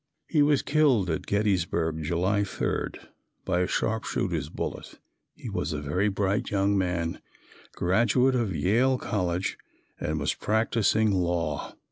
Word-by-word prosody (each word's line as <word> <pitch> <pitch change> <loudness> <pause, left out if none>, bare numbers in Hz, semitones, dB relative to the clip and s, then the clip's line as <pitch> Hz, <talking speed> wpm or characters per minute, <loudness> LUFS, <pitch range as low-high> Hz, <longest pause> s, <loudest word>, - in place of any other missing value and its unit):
He 155 - +2
was 145 -1 +3
killed 135 - +3
at 80 - -3
Gettysburg, 90 -6 0
July 90 +6 +1
3, 100 - -2 0.6
by 90 -2 +1
a 90 - +1
sharpshooter's 90 -8 -1
bullet. - - -6 0.4
He - - -9
was - - -2
a 75 - -2
very 90 +9 0
bright 100 +4 0
young 100 0 +2
man, 90 -3 -1 0.5
graduate 115 +8 +3
of 115 -8 0
Yale 125 +10 +2
college 90 -5 -2 0.4
and - - -2
was - - 0
practising 110 0 +1
law. 85 -5 -1
95 Hz, 130 wpm, -27 LUFS, 85-110 Hz, 0.6 s, was